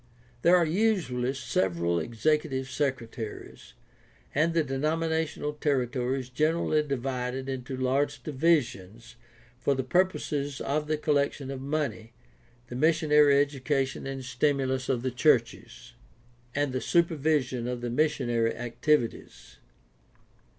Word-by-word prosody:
There 175 +6 +6
are 175 -2 +4
usually 165 - +1
several 85 -9 0
executive 135 - -1
secretaries, 120 -6 -4 0.6
and 165 +3 +1
the 165 - +3
denominational 155 +2 -1
territory 130 -3 0
is 125 - -11
generally 155 +3 +1
divided 130 -2 -3
into 130 -1 -4
large 140 +3 0
divisions 125 - 0 0.4
for 140 +2 +1
the 130 - -1
purposes 145 -3 0
of 150 +2 -1
the 155 0 0
collection 140 -2 0
of 135 -1 -6
money, 135 -6 -3 0.5
the 120 - -8
mis 160 +4 +3
sionary 150 -2 +5
education 135 -1 -1
and 135 -1 -5
stimulus 130 -1 0
of 125 -3 0
the 130 - -1
churches, 125 -2 0 0.6
and 145 -2 0
the 130 - -1
super 170 -1 +2
vision 135 -5 0
of 125 -1 -3
the 120 -1 -3
missionary 120 -5 +1
activities. 120 +1 -2
135 Hz, 120 wpm, -28 LUFS, 125-150 Hz, 0.6 s, There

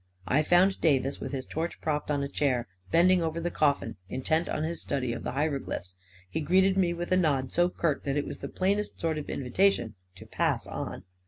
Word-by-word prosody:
I 145 +4 +3
found 180 +5 +3
Davis, 140 -3 +2
with - - -5
his 135 -2 -3
torch 165 +2 -4
propped 150 -1 -2
on 145 -1 +1
a - - -1
chair, 130 -5 0 0.2
bending 180 - +5
over 165 0 -1
the 175 +1 -2
coffin, 140 -6 +1
intent 160 +6 0
on 155 - -1
his 165 +1 -3
study 130 -4 -1
of 120 - -5
the - - -3
hieroglyphics; 140 - -2 0.3
he 155 - -3
greeted 190 +5 +4
me 185 -3 +2
with 175 +1 -4
a 185 - +5
nod 140 -7 +1
so 175 +1 +3
curt 165 -5 -1
that 140 0 0
it 145 - 0
was - - -6
the - - -6
plainest 200 +3 -1
sort 160 -2 0
of 145 - -8
invitation 135 - +1 0.2
to 95 - -12
pass - - 0
on. - - -5
155 Hz, 215 wpm, -28 LUFS, 140-175 Hz, 0.3 s, bending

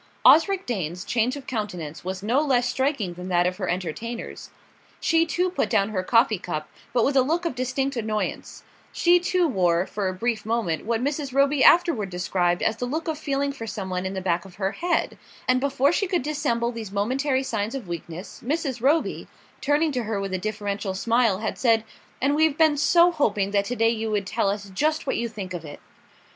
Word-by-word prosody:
Osric 385 +4 +6
Dane's 180 -6 -3
change 245 +2 +1
of 280 -2 -9
countenance 180 -10 -5
was 190 +1 -5
no 240 +7 +2
less 255 -5 +2
striking 260 -8 -1
than 180 +1 -8
that 175 -1 +2
of 180 0 -1
her 185 -3 -3
entertainers. 190 +7 -4 0.5
She 330 0 +2
too 360 +2 0
put 220 - -1
down 195 +1 +2
her 195 -4 -1
coffee 230 +1 +3
cup, 155 -4 -4 0.2
but 240 -2 +2
with 275 - +1
a 265 - +6
look 330 +7 0
of 335 - -1
distinct 265 +2 -2
annoyance; 215 -2 -3 0.3
she 350 +1 +4
too 360 0 +1
wore, 180 - +2
for 205 -1 -3
a 185 - -1
brief 230 +3 -1
moment, 220 -8 -1
what 230 +1 0
Mrs. 280 -1 -2
Roby 275 0 +3
afterward 330 - +5
described 180 -1 0
as 220 - +1
the 245 - -3
look 315 +6 -3
of 315 -2 -2
feeling 280 -2 -1
for 225 -5 -7
something 190 -4 -3
in 190 +1 -4
the 190 - -3
back 175 -2 0
of 190 -2 -14
her 195 0 -1
head; 345 +7 -1 0.3
and 255 0 +3
before 280 +1 +2
she 395 +3 0
could 355 -6 0
dissemble 280 -5 -1
these 225 -4 -7
momentary 260 +7 0
signs 220 -1 -2
of 250 -8 -6
weakness, 170 +1 -7
Mrs. 275 -2 -2
Roby, 295 +6 +1 0.3
turning 295 +2 +2
to 250 -4 -2
her 215 -2 -2
with 195 -1 -4
a 185 - -1
deferential 205 -1 -3
smile, 225 -1 +2
had 220 - -3
said: 225 -3 +3 0.4
"And 275 +3 +2
we've 310 -1 +2
been 315 -2 +4
so 340 +4 +5
hoping 205 - 0
that 200 -1 +2
to 245 - -3
day 225 -1 +3
you 225 -1 -2
would 205 -2 -1
tell 205 0 0
us 200 0 -4
just 310 +9 0
what - - -1
you 235 0 -2
think 200 -4 -7
of 175 -2 -5
it." 145 -2 -9
230 Hz, 210 wpm, -24 LUFS, 195-280 Hz, 0.5 s, Osric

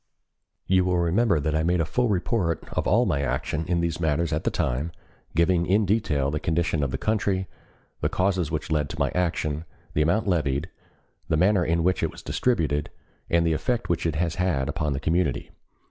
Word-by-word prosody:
"You 95 0 +3
will 90 -1 +1
remember 85 +2 +2
that 75 +2 -1
I 80 - +2
made 85 +2 +1
a 80 - +2
full 120 +9 0
report 90 -3 0
of - - -1
all 115 +6 +4
my 75 -7 0
action 70 +4 -2
in 85 -1 +1
these 85 -1 -1
matters 80 0 0
at 75 - -2
the - - +3
time, 70 +7 -1 0.4
giving 85 +1 +3
in 100 +3 +3
detail 80 -10 +1
the 75 - -1
condition 80 0 0
of 70 - 0
the - - -2
country, 100 -3 0 0.5
the - - 0
causes 90 -4 0
which 80 0 -3
led 75 -2 +1
to 80 - -7
my 70 -2 +1
action, 80 -3 -1 0.3
the 75 - +1
amount 90 +9 +2
levied, 75 -2 0 0.6
the 80 - +1
manner 95 +2 +4
in 85 0 +1
which 90 +2 +1
it - - +1
was - - -12
distributed, 75 - 0 0.4
and 85 0 +3
the 80 - +2
effect 120 +9 -1
which 85 -1 0
it 80 - -1
has 85 +1 -1
had 75 -8 +1
upon 75 -2 -1
the 70 - -2
community. 80 -2 0
85 Hz, 205 wpm, -25 LUFS, 75-90 Hz, 0.6 s, all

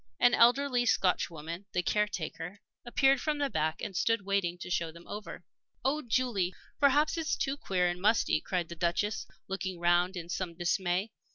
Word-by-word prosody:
An 245 - +5
elderly 245 +1 +4
Scotchwoman, 170 -2 0
the 180 - +1
caretaker, 195 -2 -2 0.3
appeared 270 +1 +3
from 305 -1 0
the 285 -2 -1
back 155 +1 -1
and 195 - -4
stood 230 +1 +1
waiting 195 -3 0
to 175 - -8
show 170 -2 0
them 170 +1 -15
over. 210 0 -7 0.4
"Oh, 295 +3 +2
Julie, 225 -8 0 0.2
perhaps 295 +3 +3
it's 320 - 0
too 270 0 -1
queer 185 -9 0
and 175 0 -3
musty!" 210 -6 +3
cried 180 -3 -2
the 170 - -6
Duchess, 175 +6 -1 0.2
looking 190 -2 -4
round 175 +2 +3
her 175 - -3
in 170 - -14
some 175 -1 -3
dismay. 180 +3 0
190 Hz, 175 wpm, -30 LUFS, 175-240 Hz, 0.4 s, An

